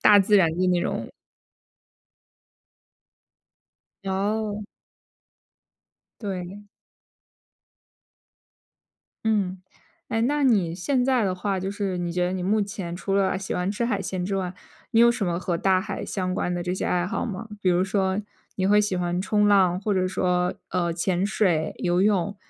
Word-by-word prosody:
大 210 -1 +7
自 205 +1 +4
然 185 -4 +5
的 180 +3 0
那 180 -1 +2
种。 - - -2 3.0
哦。 205 +2 -1 1.6
对。 195 0 -6 2.6
嗯， 195 -4 0 0.5
诶， 225 - 0
那 290 +5 +1
你 195 -10 +3
现 250 +8 0
在 255 -4 +2
的 185 - 0
话， 195 +1 -2
就 190 +1 -3
是 200 -2 -2
你 175 -1 -2
觉 180 0 +1
得 180 - -2
你 185 -1 -3
目 210 +4 +2
前 195 -4 -5
除 195 +2 -2
了 190 -1 +2
喜 195 - -5
欢 180 +2 -1
吃 210 +4 -1
海 245 - 0
鲜 185 -2 -3
之 195 +1 -1
外， 185 -1 -3 0.4
你 225 - +5
有 235 0 +7
什 230 -4 -1
么 170 -1 0
和 175 -1 -1
大 190 +1 +3
海 195 0 -5
相 185 -2 -2
关 180 - -1
的 175 - -2
这 180 - -2
些 - - -3
爱 180 0 +1
好 225 +5 -2
吗？ 220 0 -6
比 190 - +1
如 180 0 +3
说 190 0 0 0.4
你 190 - +1
会 205 +1 +5
喜 205 -3 0
欢 175 0 -1
冲 210 +2 +2
浪， 185 -3 +4
或 205 +1 -1
者 185 -1 +1
说， 180 -1 0
呃， 175 -2 0
潜 175 +2 0
水、 185 -6 +1
游 175 0 +1
泳， 200 -1 +2
190 Hz, 175 characters per minute, -25 LUFS, 180-205 Hz, 3.0 s, 大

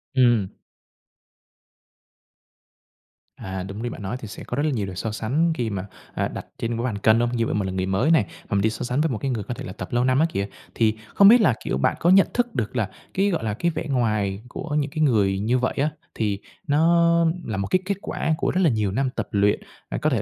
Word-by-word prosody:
Ừm. 120 -7 +3 2.8
À, 95 -7 -5
đúng 100 +3 -7
như 120 - -1
bạn 120 - -8
nói, 100 +5 -3
thì 110 - -8
sẽ 105 - -9
có - - -4
rất 145 - 0
là - - +2
nhiều 110 -7 -1
điều 95 -1 -7
so 110 +5 -3
sánh 135 +10 +1
khi 120 -7 -2
mà, 100 -2 -4 0.3
à, - - 0
đặt - - -7
trên 115 - -2
cái 115 - -2
bàn 110 -5 -2
cân 110 +2 +4
hông? 120 0 +2
Như 115 - +1
vậy - - -1
mình 100 -2 0
là 95 - -3
người 95 0 -1
mới 95 +11 +2
này, 160 - +5
mà 165 -9 -7
mình 100 - +3
đi 110 - +3
so 110 - -5
sánh 125 +4 0
với 160 - +1
một 125 - -2
cái 135 +3 -2
người 110 -4 -2
có 120 - -4
thể - - -7
là 90 - -7
tập - - -7
lâu 120 +1 +2
năm 130 +1 +3
á 160 - +5
kìa. 100 -10 -2 0.3
Thì 110 -2 +2 0.2
không 200 - +7
biết 235 +3 +8
là, 130 - +4
kiểu, - - -1
bạn 65 - +1
có 170 - +2
nhận 190 +1 +6
thức 240 -1 0
được 115 +1 -2
là, 110 -4 0 0.2
cái 195 +2 +2
gọi 170 - -1
là, 110 -2 -1
cái 170 +11 0
vẻ 160 - -4
ngoài 105 -6 0
của 150 +3 -5
những 150 -1 0
cái 155 - -3
người 100 -8 +2
như 115 +5 +1
vậy 125 - 0
á, 145 +3 +2 0.3
thì 105 -3 -1 0.3
nó 170 +3 +4 0.2
là 110 -3 -3
một 100 0 -2
cái 185 - +2
kết 200 0 -1
quả 160 - -1
của - - 0
rất 185 - +1
là 170 - +5
nhiều 105 -5 0
năm 130 +6 0
tập - - -2
luyện, 100 0 +2 0.3
à, - - -3
có - - +1
thể - - 0
120 Hz, 265 wpm, -24 LUFS, 105-150 Hz, 2.8 s, biết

